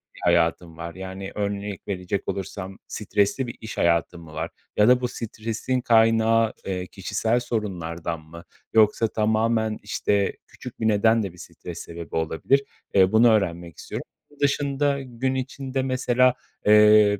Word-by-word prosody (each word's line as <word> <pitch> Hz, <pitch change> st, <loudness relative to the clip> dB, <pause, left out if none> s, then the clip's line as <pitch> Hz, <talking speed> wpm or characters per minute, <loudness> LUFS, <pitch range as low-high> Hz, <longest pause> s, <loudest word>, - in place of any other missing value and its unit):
bir -, -, -13 dB
hayatın 85 Hz, -1 st, +2 dB
var. 85 Hz, 0 st, -7 dB
Yani, 95 Hz, +1 st, -7 dB
örnek 100 Hz, -1 st, -3 dB
verecek 95 Hz, 0 st, -3 dB
olursam: 95 Hz, 0 st, -5 dB
Stresli 105 Hz, +4 st, 0 dB
bir -, -, -6 dB
iş 110 Hz, -, -7 dB
hayatın 85 Hz, 0 st, +1 dB
mı 80 Hz, -1 st, -13 dB
var? -, -, -3 dB, 0.3 s
Ya 105 Hz, +2 st, +5 dB
da 125 Hz, 0 st, +5 dB
bu 125 Hz, -, 0 dB
stresin 115 Hz, +3 st, -3 dB
kaynağı, 115 Hz, -1 st, +4 dB
eee, 90 Hz, -1 st, -3 dB
kişisel 110 Hz, +5 st, -1 dB
sorunlardan 85 Hz, -8 st, -3 dB
mı? 85 Hz, +2 st, -12 dB, 0.3 s
Yoksa 110 Hz, +1 st, +4 dB
tamamen, 110 Hz, 0 st, +1 dB
işte, 100 Hz, -1 st, 0 dB
küçük -, -, -11 dB
bir 110 Hz, -, +1 dB
neden 110 Hz, +1 st, +3 dB
de 95 Hz, -3 st, -5 dB
bir -, -, -17 dB
stres -, -, -9 dB
sebebi 85 Hz, 0 st, -8 dB
olabilir, 80 Hz, -, +1 dB, 0.3 s
eee, 95 Hz, 0 st, +5 dB
bunu 115 Hz, +2 st, +6 dB
öğrenmek 85 Hz, -6 st, 0 dB
istiyorum. -, -, -6 dB, 0.3 s
Bunun 145 Hz, -, -22 dB
dışında 140 Hz, 0 st, +1 dB
gün 130 Hz, +1 st, -2 dB
içinde 130 Hz, 0 st, -3 dB
mesela, 130 Hz, -1 st, +3 dB, 0.3 s
eee, 105 Hz, -1 st, +6 dB
105 Hz, 150 wpm, -24 LUFS, 95-115 Hz, 0.3 s, bunu